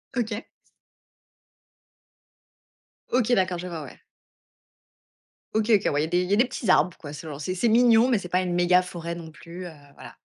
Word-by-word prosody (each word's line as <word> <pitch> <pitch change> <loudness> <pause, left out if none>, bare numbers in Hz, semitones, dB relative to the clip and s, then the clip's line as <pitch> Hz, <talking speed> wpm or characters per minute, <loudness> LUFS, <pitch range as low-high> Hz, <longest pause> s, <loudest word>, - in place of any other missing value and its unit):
OK. 225 -2 -3 2.6
OK, 245 -1 +1
d'accord. 185 -2 0
Je 180 +1 -6
vois, 165 -3 -6
ouais. 135 - -12 1.6
OK, 220 +1 0
OK, - - -1
ouais. 145 +1 +1
Il 165 - -8
y - - +4
a - - +1
il 180 - -5
y - - +4
a - - +6
des 240 +5 +4
petits 245 -4 -5
arbres, 180 -1 +3
quoi. 145 -2 -9
C'est 155 +2 -9
genre, 145 -2 -7
c'est 185 +5 -3
c'est 230 +6 +1
mignon 235 +1 +5
mais 240 - +3
c'est 180 - -8
pas 180 +1 +2
une 180 -1 -2
méga 175 +1 +4
forêt 170 -2 -6
non 165 -2 -9
plus, 170 +3 -10
heu, 170 - -9 0.2
voilà. - - -13
180 Hz, 200 wpm, -25 LUFS, 170-220 Hz, 2.6 s, a